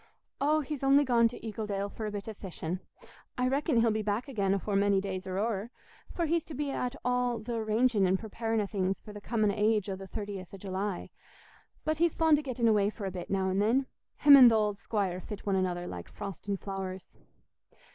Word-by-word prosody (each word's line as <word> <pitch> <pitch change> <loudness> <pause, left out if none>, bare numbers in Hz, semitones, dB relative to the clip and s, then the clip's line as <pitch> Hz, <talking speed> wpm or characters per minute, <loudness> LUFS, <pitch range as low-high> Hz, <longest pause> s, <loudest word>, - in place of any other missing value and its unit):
"Oh, 305 +2 +3
he's 295 -1 -5
only 275 +1 +5
gone 235 -2 +4
to 230 - -7
Eagledale 210 -2 -3
for 220 - -5
a - - -4
bit 205 0 -6
o' 220 - -4
fishing; 180 -3 -5 0.6
I 250 0 +2
reckon 275 -1 +2
he'll 230 -1 +3
be 215 0 0
back 210 +5 -1
again 200 -7 +1
afore 200 +1 -2
many 200 0 +3
days 190 -1 -4
are 185 0 -3
o'er, 215 0 -1 0.4
for 340 - -1
he's 330 0 +1
to 310 - -8
be 285 +1 -2
at 250 0 -2
all 250 -1 +1
th' 220 +3 -11
arranging 220 -2 +2
and 185 +1 +2
preparing 225 +1 -2
o' - - -1
things 195 -2 -1
for 210 - -11
the 205 - -9
comin' 215 -1 +1
o' - - -4
age 210 -1 +1
o' - - -2
the 190 0 -9
30th 200 -2 -6
o' - - -9
July. 195 0 -4 0.7
But 310 0 0
he's 340 -1 +2
fond 320 -2 +4
o' - - -3
getting 250 -4 -1
away 205 -2 +4
for 210 -1 -7
a 190 - -2
bit, 180 -1 -7
now 190 -1 +1
and 190 +2 +1
then. 245 +6 +2 0.3
Him 285 -1 +9
and 255 -3 +10
th' - - +2
old 210 -2 +1
squire 195 -5 -2
fit 210 +1 -8
one 200 -1 +1
another 180 -2 -1
like 90 - -7
frost 200 -1 -8
and 200 -1 -1
flowers." 190 -2 -6
210 Hz, 225 wpm, -30 LUFS, 195-245 Hz, 0.7 s, and